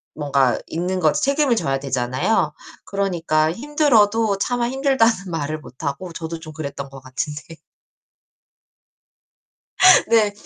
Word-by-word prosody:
뭔가 140 -4 +1
있는 180 +3 -2
거지 155 -3 +2
책임을 280 -3 +2
져야 135 -9 -1
되잖아요. 130 - 0 0.3
그러니까 170 -5 0
힘들어도 230 - +2
차마 245 +2 0
힘들다는 265 -4 +2
말을 155 -2 -3
못 130 +1 -14
하고 155 +6 -4
저도 165 0 -6
좀 155 -1 -10
그랬던 140 -3 -6
것 135 0 -11
같은데 150 +3 -5 2.7
네. 220 -3 +3
165 Hz, 260 characters per minute, -21 LUFS, 145-225 Hz, 2.7 s, 네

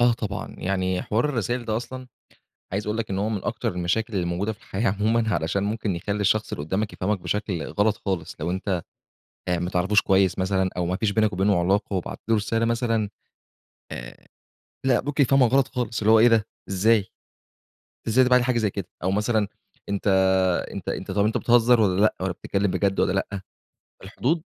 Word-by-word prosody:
آه 120 0 +5
طبعًا، 110 -1 -5
يعني 95 -1 -1
حوار 110 +5 0
الرسايِل 120 -3 -1
ده 110 -1 -1
أصلًا، 130 +2 -6 0.7
عايِز 100 +2 -2
أقول 105 +2 -2
لك 115 - -3
إن 95 - -2
هو 105 +2 0
من 105 -4 -3
أكتر - - -2
المشاكل 95 +6 -1
اللي 90 -3 0
موجودة 90 +5 -1
في 105 - -21
الحياة 105 -1 -1
عمومًا، 110 +2 +1
علشان 95 +5 -1
ممكن 105 -3 -2
يخلِّي 100 +4 -3
الشخص 110 +2 +1
اللي 70 - -4
قدَّامك 100 +6 -2
يفهَمَك 100 +2 -1
بشكل 95 -4 -2
غلط 105 +6 0
خالص، 90 -5 -2
لو 80 +3 -2
أنتَ 95 -1 -2 0.7
آآ، 90 -1 +1
ما 90 +1 -2
تعرفوش 95 +3 +2
كويِّس 95 -2 +2
مثلًا، 95 0 +1
أو 90 -1 0
ما 90 - -1
فيش 110 +1 0
بينك 110 0 +2
وبينه 95 0 +2
علاقة 100 +3 +1
وبعَتّ 90 - -4
له 115 - +4
رسالة 115 +2 0
مثلًا. 115 -2 0 0.8
آآ - - -9 0.6
لأ، 125 -2 +4
ممكن 145 +1 +1
يفهَمَك 135 -2 +4
غلط 135 -1 +4
خالص، 120 -4 -3
اللي 110 0 +3
هو 110 - +7
إيه 115 +2 +7
ده؟ 115 -2 +3 0.2
إزاي؟! 100 +2 +3 1.0
إزاي 120 +4 +4
ده 125 - +2
بعَتّ 125 0 +6
لي 125 - -1
حاجة 125 -2 +1
زي 110 -3 +1
كده؟! 95 -2 -5 0.2
أو 95 - +1
مثلًا 105 +1 +1 0.4
أنتَ 100 +1 -2 0.6
أنتَ - - -6
أنتَ - - -4
طَب 100 0 +2
أنتَ 110 - +1
بتهزَر 120 -1 +4
والّا 95 -1 +2
لأ، 110 - +3
والّا 95 -1 -1
بتتكلَّم 100 +2 -1
بجد 95 +1 0
والّا - - +2
لأ؟ 100 -1 -2 0.6
الحدود 130 - -1
105 Hz, 200 wpm, -24 LUFS, 95-115 Hz, 1.0 s, هو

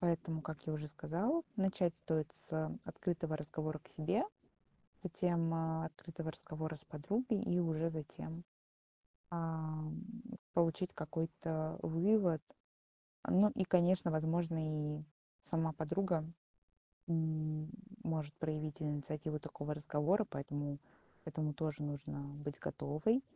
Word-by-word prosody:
Поэтому, 165 -2 +2
как 155 -2 -6
я 155 - +1
уже 150 0 -2
сказала, 185 - +1
начать 190 -4 +3
стоит 155 -2 +1 0.2
с 155 -1 0
открытого 165 -3 -1
разговора 155 +1 -2
к - - -20
себе, 175 +9 +2 0.8
затем, 170 -2 +2
э, 160 0 +1
открытого 160 +1 -5
разговора 155 0 -4
с 150 - -14
подругой 205 - +1
и 180 -6 +3
уже 165 -1 +2
затем, 160 +1 -5 0.9
ам, 160 -2 -2 0.5
получить 170 +1 +3
какой-то 160 0 -1
вывод. 175 -1 +4 0.9
Ну 205 +3 +7
и, 190 - +3
конечно, 180 -1 +5
возможно, 155 -2 +1
и - - -7 0.4
сама 160 -1 +1
подруга, 170 +2 +1 0.9
м, 155 -1 +1 0.3
может 155 -4 -1
проявить 155 0 -2
инициативу 150 +1 -1
такого 145 +1 -3
разговора. 155 +8 +3
Поэтому 145 0 -2 0.5
к - - -5
этому 155 -1 0
тоже 155 -1 -1
нужно 145 -1 -3 0.2
быть 145 -1 -3
готовой 155 - +2
160 Hz, 115 wpm, -38 LUFS, 155-170 Hz, 0.9 s, Ну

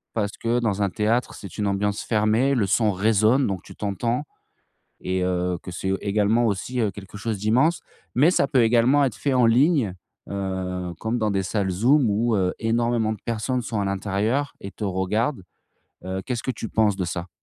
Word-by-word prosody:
parce 105 -2 -2
que 115 +1 0
dans 105 -4 -1
un 100 - +2
théâtre, 110 +6 0
c'est 100 - -10
une 105 -1 0
ambiance 100 +1 0
fermée, 110 +5 +2
le 110 -5 +2
son 105 +3 +2
résonne 110 +6 +3
donc 95 -3 -3
tu - - -13
t'entends 115 +6 -2 0.8
et 95 0 -2
heu, 90 -1 -1
que - - -9
c'est, 95 +2 -3
heu, 95 - 0
également 105 +3 +2
aussi, 110 +5 -2
heu, 110 - +2
quelque 100 +1 -10
chose 110 0 -3
d'immense. 125 - +2 0.3
Mais 145 +8 +5
ça 140 - +2
peut 135 -4 +3
également 120 +5 +4
être 125 -5 -2
fait 140 - -1
en 125 -2 +5
ligne, 125 - +3 0.4
heu, 95 -2 -3
comme 115 +2 -1
dans 110 -1 +1
des 95 -1 0
salles 95 +1 -1
Zoom 120 +8 +3
où, 110 +3 +1
heu, 90 -2 +1
énormément 115 -1 +1
de 105 - -11
personnes 115 +2 -1
sont 115 -2 -3
à 100 - 0
l'intérieur 105 +8 -1
et 100 - -8
te 110 - -8
regardent. 100 +5 -1 0.6
Heu, 95 +1 -3
qu'est-ce 120 -3 -3
que 130 - -1
tu 115 -2 -6
penses 110 -3 +2
de 95 - -2
ça? 85 +1 -4
110 Hz, 200 wpm, -24 LUFS, 95-120 Hz, 0.8 s, Mais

